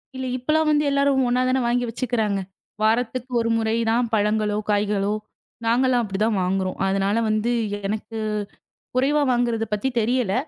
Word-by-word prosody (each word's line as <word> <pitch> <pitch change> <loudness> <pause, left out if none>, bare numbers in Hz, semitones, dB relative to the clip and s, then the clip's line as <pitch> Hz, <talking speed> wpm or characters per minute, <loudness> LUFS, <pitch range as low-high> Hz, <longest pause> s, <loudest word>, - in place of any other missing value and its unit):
இல்ல 260 0 -4
இப்பலாம் 305 +5 +1
வந்து 300 0 +3
எல்லாரும் 280 -1 +2
ஒண்ணா 250 +1 +2
தானே 260 +1 +2
வாங்கி 245 +1 +1
வச்சுக்குறாங்க. 225 -4 -1 0.4
வாரத்துக்கு 245 +3 0
ஒரு 230 0 0
முறை 220 0 0
தான் 235 +2 +2
பழங்களோ, 210 0 +1
காய்களோ. 205 -1 +1 0.5
நாங்கல்லாம் 245 +1 +3
அப்படி 195 -3 -4
தான் 220 -3 +1
வாங்குறோம். 185 0 -1
அதனால 195 +2 +1
வந்து 215 +2 +1 0.4
எனக்குக் 215 0 -3 0.6
குறைவா 285 +3 +2
வாங்குறது 235 -2 0
பத்தி 210 +6 0
தெரியல. 230 -2 +1
230 Hz, 145 wpm, -23 LUFS, 210-255 Hz, 0.6 s, வந்து